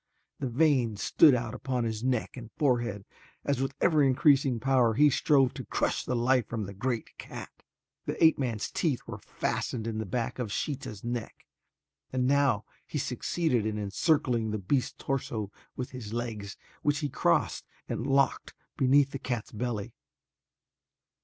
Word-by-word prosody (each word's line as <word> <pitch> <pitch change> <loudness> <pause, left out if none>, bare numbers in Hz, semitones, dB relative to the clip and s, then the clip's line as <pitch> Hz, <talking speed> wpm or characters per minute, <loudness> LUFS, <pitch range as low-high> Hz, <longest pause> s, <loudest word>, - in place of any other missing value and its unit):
The 135 - -2
veins 125 -5 +2
stood 150 -5 +6
out 120 -1 -3
upon 125 -1 -2
his 110 -1 -3
neck 125 -3 0
and 120 -3 -9
forehead 120 -8 0 0.4
as 140 -2 0
with 135 0 -2
ever 155 -3 +4
increasing 135 -2 +4
power 125 -2 +3
he 150 +3 +6
strove 135 -2 +3
to - - -6
crush - - 0
the 125 - -2
life 125 0 +2
from 115 -2 -3
the 100 0 -6
great 115 +3 -3
cat. - - -8 0.6
The - - -1
ape 160 -2 +6
man's 115 -6 -2
teeth 145 -8 0
were - - -7
fastened 115 -3 -3
in 110 -1 -2
the 110 - -3
back 120 0 -2
of 115 -5 -3
Sheeta's 125 -6 -4
neck 120 -1 -5 0.7
and 130 -1 0
now 135 -5 +3 0.2
he - - -4
succeeded 130 0 0
in 105 -1 -2
encircling 115 - +1
the 110 - -1
beast's 115 +6 0
torso 110 -6 -3 0.2
with 125 - -5
his 115 -4 -7
legs 110 -4 -4 0.2
which 145 0 +2
he 145 - 0
crossed 85 -9 +1 0.2
and 120 - -3
locked 135 -1 +1 0.2
beneath 135 +1 +4
the 135 - -5
cat's 120 -4 -3
belly. 115 0 -3
125 Hz, 160 wpm, -29 LUFS, 110-135 Hz, 0.7 s, stood